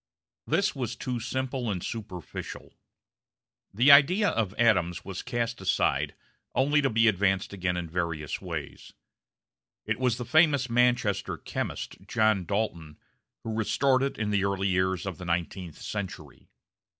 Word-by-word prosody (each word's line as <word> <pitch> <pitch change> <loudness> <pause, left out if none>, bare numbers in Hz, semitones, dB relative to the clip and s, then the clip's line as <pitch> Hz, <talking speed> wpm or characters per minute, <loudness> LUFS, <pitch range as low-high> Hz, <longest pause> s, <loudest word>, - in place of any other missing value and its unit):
This 200 - +1
was 120 -3 -3
too 125 0 -3
simple 130 0 -3
and 90 -4 -3
superficial. 105 -7 -7 1.0
The 120 +8 +5
idea 180 +9 +6
of 105 -3 -1
atoms 90 -7 +2
was 95 -1 -5
cast 120 -2 -3
aside, 95 - +1 0.4
only 145 +3 +3
to 135 - +2
be 115 0 +3
advanced 95 -1 +1
again 90 -2 -1
in 85 -1 -3
various 80 -3 -3
ways. - - -7 0.9
It - - -2
was 125 -3 +1
the 125 - -5
famous 140 -2 +3
Manchester 120 -4 +2
chemist, - - -5
John 110 -4 +2
Dalton, 85 -6 -3 0.5
who 115 - -4
restored 130 +4 +2
it 135 0 -1
in 105 -1 -1
the 100 -2 +2
early 100 0 0
years 95 -1 0
of 95 -5 -5
the 90 - -7
nineteenth 85 0 -3
century. 100 -3 -7
110 Hz, 140 wpm, -28 LUFS, 95-125 Hz, 1.0 s, idea